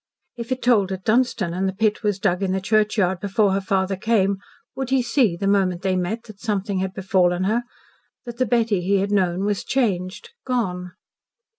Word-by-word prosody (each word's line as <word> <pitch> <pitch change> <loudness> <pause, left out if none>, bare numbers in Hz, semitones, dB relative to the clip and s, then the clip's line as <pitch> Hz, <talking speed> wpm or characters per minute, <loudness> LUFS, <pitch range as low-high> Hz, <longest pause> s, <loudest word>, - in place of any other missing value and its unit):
If 235 0 -7
it 255 - -2
tolled 210 -6 +3
at 190 0 -5
Dunstan 220 -6 +1
and 190 +2 0
the - - -4
pit 215 +1 +1
was 205 -3 0
dug 190 -2 0
in 190 -1 0
the 190 - 0
churchyard 210 -2 +1
before 200 +1 +1
her 195 - 0
father 190 0 0
came, 195 -1 +1 0.4
would 265 -1 -3
he 265 -1 +2
see, 235 -7 +2
the 195 - -3
moment 195 -3 +1
they 190 -1 +1
met, 185 +6 -2
that 215 -3 -13
something 200 -3 -2
had 190 0 -3
befallen 185 -2 +1
her 220 +5 +1 0.6
that 240 -1 -8
the 255 - +2
Betty 225 -4 +1
he 195 +3 +2
had 200 +1 -1
known 185 -1 +1
was 205 -1 -1
changed 190 -8 -1
gone? 180 -8 -2
200 Hz, 195 wpm, -22 LUFS, 185-225 Hz, 0.6 s, tolled